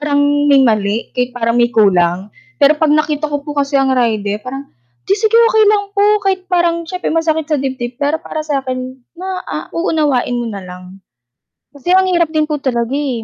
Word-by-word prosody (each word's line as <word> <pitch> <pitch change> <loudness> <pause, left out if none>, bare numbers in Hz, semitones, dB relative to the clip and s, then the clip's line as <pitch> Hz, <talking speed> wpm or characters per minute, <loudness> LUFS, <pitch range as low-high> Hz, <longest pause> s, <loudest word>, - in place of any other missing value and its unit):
parang 290 -1 +1 0.3
may 275 -1 +6
mali, 215 -1 0
kahit 250 0 -1
parang 230 -1 0
may 240 0 +3
kulang. 190 -3 +2 0.3
Pero 285 +1 +5
'pag 315 -1 +2
nakita 305 0 +1
ko 290 -1 -3
po 295 - -5
kasi 280 0 0
ang 270 -1 +2
rider 215 -4 0
parang, 270 +3 -7 0.4
"Hindi 395 - +2
sige 440 +1 +2
okey 460 -2 +5
lang 415 -1 +2
po," 405 0 +2 0.2
kahit 380 -1 0
parang 340 -1 +1
siyempre 365 -3 -3
masakit 320 -1 0
sa 305 - +2
dibdib, 255 -2 -4
pero 290 +3 0
para 310 - -5
sa 295 -3 -1
akin 255 -1 -3 0.4
ma 370 0 -4
ah, - - -5
uunawain 300 -7 0
mo 240 - -3
na 200 -2 -7
lang. 180 +1 -12 0.7
Kasi 320 +6 0
ang 380 - +5
hirap 345 -2 +2
din 310 -1 +1
po 300 -1 -3
talaga, 240 -3 -2
eh, 275 -5 -2
285 Hz, 200 wpm, -15 LUFS, 240-325 Hz, 0.7 s, may